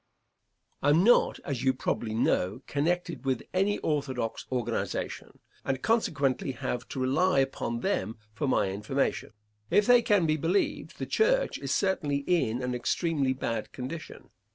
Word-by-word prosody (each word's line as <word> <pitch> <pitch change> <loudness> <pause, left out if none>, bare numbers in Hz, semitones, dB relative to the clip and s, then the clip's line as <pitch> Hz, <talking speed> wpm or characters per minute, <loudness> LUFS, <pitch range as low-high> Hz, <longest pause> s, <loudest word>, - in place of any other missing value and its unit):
I 145 - +3
am 160 +5 +5
not, 240 +4 +4
as 135 -4 -3
you 130 -1 +3
probably 110 -3 -2
know, 110 +1 +1
connected 165 +1 -1
with 130 -2 -1
any 195 +3 +2
orthodox 130 -7 -2
organization, 125 -3 -3 0.3
and 135 -1 -2
consequently 140 - +1
have 125 0 -4
to 135 - -5
rely 155 +7 +2
upon 135 -3 0
them 110 +4 -1 0.2
for 140 +6 -2
my 100 -7 +2
information. 105 +4 -2 0.4
If 205 - +4
they 245 +1 +6
can 205 -6 +3
be 155 0 +2
believed, 170 +6 -1
the - - -3
church - - +2
is - - -4
certainly 145 -8 0
in 125 -9 +1
an 125 0 -1
extremely 135 +2 0
bad 115 -4 -3
condition. 135 +6 -7
140 Hz, 150 wpm, -28 LUFS, 125-175 Hz, 0.4 s, they